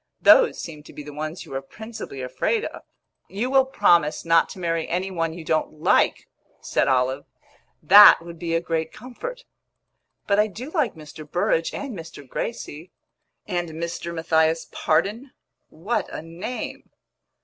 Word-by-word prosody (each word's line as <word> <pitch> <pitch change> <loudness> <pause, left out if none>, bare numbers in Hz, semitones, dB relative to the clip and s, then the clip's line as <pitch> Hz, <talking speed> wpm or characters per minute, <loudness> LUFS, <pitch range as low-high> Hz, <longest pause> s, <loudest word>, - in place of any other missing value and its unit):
"Those - - +6
seemed 155 -3 -8
to - - -13
be 150 - -8
the 150 0 -10
ones 155 +3 -5
you - - -14
were 135 0 -3
principally 220 - -8
afraid 435 - -1
of." - - -7 0.5
"You 230 +6 -2
will 270 -1 +5
promise 170 - +2
not 165 0 +4
to - - -9
marry 165 -2 -1
any 185 +3 -2
one 165 -2 -2
you 170 -2 -9
don't 155 0 0
like," 155 0 +2 0.3
said - - 0
Olive. 130 0 +1 0.6
"That 205 +2 +10
would 170 0 -11
be 165 -1 -2
a 165 - +1
great 160 -1 -2
comfort!" 480 - -8 0.8
"But 200 0 +2
I 210 - +4
do 240 +8 -8
like 295 - 0
Mr. 155 -1 -11
Burrage 165 -2 +1
and 275 -5 -5
Mr. 165 -5 -10
Gracie." 165 - -5 0.6
"And 175 -4 -2
Mr. 170 +1 -5
Matthias 160 -1 +1
Pardon? 215 - 0 0.4
What 195 +10 -3
a - - -6
name!" 170 +9 -6
170 Hz, 160 wpm, -24 LUFS, 160-215 Hz, 0.8 s, That